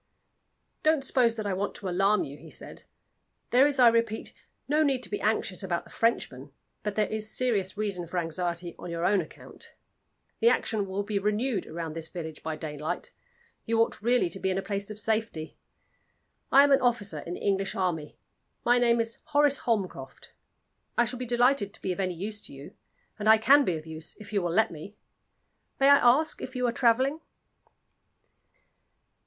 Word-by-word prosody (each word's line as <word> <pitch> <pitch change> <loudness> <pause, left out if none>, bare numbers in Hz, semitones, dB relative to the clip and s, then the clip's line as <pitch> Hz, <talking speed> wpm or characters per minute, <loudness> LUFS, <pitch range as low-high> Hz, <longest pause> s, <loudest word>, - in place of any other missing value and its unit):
"Don't 310 -2 +2
suppose 245 -3 +2
that 215 -2 -4
I 200 - -1
want 195 +2 -2
to 195 - -6
alarm 195 +4 +2
you," 140 - -7
he 145 - -13
said. - - -9 0.7
"There 260 +4 +6
is, 285 -1 -1
I 250 -2 +7
repeat, 230 -1 +1 0.3
no 300 +3 +2
need 270 -4 +1
to - - -5
be 205 - -3
anxious 210 -3 0
about 175 -3 -2
the - - -18
Frenchmen, 145 - -1 0.3
but 210 -1 -3
there 215 - +2
is 215 0 -4
serious 210 -7 0
reason 200 -5 -2
for 180 - -5
anxiety 170 0 -2
on 175 - -7
your 170 0 -2
own 195 0 +3
account. 155 - -13 0.6
The 465 - +5
action 215 - 0
will 195 +2 -2
be 205 0 -1
renewed 210 +1 -1
round 165 -1 -5
this 165 -1 -5
village 160 -3 -7
by 160 -1 -3
daylight; 150 0 -5 0.5
you 225 0 +1
ought 230 - +1
really 240 -1 +2
to 195 - -4
be 190 - -1
in 185 - 0
a 195 - -2
place 200 0 -3
of 210 0 -6
safety. 215 -7 -2 1.0
I 275 - +8
am 285 - +3
an 275 0 +5
officer 230 -10 0
in 175 +4 -6
the - - -8
English 195 -1 0
army 170 -5 -2 0.5
my 245 +1 +4
name 235 -1 +3
is 230 0 -2
Horace 290 -2 +3
Holmcroft. 190 - -3 0.7
I 240 - +5
shall 245 +1 -5
be 250 - -4
delighted 240 -3 +2
to - - -16
be 190 - -1
of 180 - -10
use 200 +4 -5
to - - -9
you, 140 +2 -11 0.5
and 215 +1 +1
I 220 - +8
can 280 +6 +6
be 175 -10 0
of 155 - -10
use, 160 0 -8
if 210 0 -11
you 200 - +2
will 175 -1 -1
let 220 +6 +2
me. 170 +6 -10 0.8
May 275 +1 +5
I 285 - +9
ask 275 +6 +3
if 260 - -7
you 250 0 0
are 240 - +2
traveling?" 260 +6 +2
210 Hz, 195 wpm, -28 LUFS, 180-240 Hz, 1.0 s, I